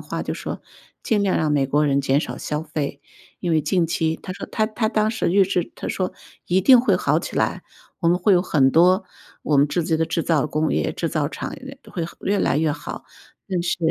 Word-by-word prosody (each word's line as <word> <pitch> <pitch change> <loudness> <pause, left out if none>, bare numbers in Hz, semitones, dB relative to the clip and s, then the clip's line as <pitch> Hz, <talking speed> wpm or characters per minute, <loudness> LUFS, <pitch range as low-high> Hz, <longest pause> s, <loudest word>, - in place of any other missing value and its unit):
话 - - -5
就 - - -3
说， - - -6 0.4
尽 210 -3 +1
量 195 - +1
让 155 -2 +1
美 140 -2 +2
国 150 +2 +2
人 140 -1 +2
减 140 0 +2
少 - - -5
消 150 +1 -3
费。 150 -2 -4 0.4
因 175 - -2
为 155 - +3
近 175 +2 +1
期 160 -1 0
他 185 - -5
说 - - -7
他 215 - 0
他 220 0 -1
当 215 -1 +1
时 225 -6 -1
预 195 +1 +5
制 180 -2 -1
他 - - -7
说 185 -1 -2 0.3
一 185 +2 +2
定 255 +1 +7
会 255 - +2
好 - - +1
起 - - -6
来， - - 0 0.4
我 170 - +1
们 175 +1 +3
会 195 +3 +3
有 175 - +5
很 140 -7 +3
多 180 +6 +4 0.4
我 150 - +1
们 145 +1 +4
自己 165 0 0
的 165 - +1
制 165 - -1
造 155 -3 +1
工 155 +1 0
业， - - 0
制 165 - -2
造 150 -2 0
厂 - - -6
呃， 275 +1 -11
会 170 - -3 0.2
越 200 +1 0
来 145 - +1
越 155 -1 +1
好， - - -7 0.4
但 185 -3 -1
是 175 - -1
170 Hz, 255 characters per minute, -22 LUFS, 150-190 Hz, 0.4 s, 定